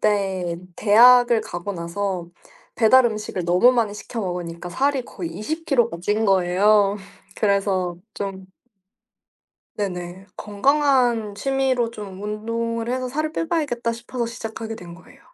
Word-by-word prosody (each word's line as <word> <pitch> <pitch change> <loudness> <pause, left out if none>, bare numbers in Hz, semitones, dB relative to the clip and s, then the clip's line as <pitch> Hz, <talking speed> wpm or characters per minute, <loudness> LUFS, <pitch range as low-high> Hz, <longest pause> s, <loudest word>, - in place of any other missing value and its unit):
때 190 -5 0 0.2
대학을 240 +2 +6
가고 175 +2 -5
나서 180 0 -3 0.5
배달 250 +3 +5
음식을 215 -5 -4
너무 180 +9 +5
많이 225 -4 0
시켜 225 +2 -6
먹으니까 175 -3 -5
살이 275 +7 0
거의 175 -8 -7
20 300 - -5
키로가 240 - +1
찐 210 +3 0
거예요. 195 +2 +3 0.4
그래서 195 -4 0 0.2
좀 195 -1 -5 1.3
네네. 185 -2 -5
'건강한 240 -1 +1
취미로 260 0 0
좀 205 -4 -9
운동을 230 +2 -3
해서 255 0 -2
살을 310 +4 -2
빼 330 - -2
봐야겠다.' 275 -9 -1
싶어서 235 +1 -4
시작하게 225 -1 -6
된 175 -6 -10
거예요. 170 0 -18
215 Hz, 275 characters per minute, -22 LUFS, 190-240 Hz, 1.3 s, 대학을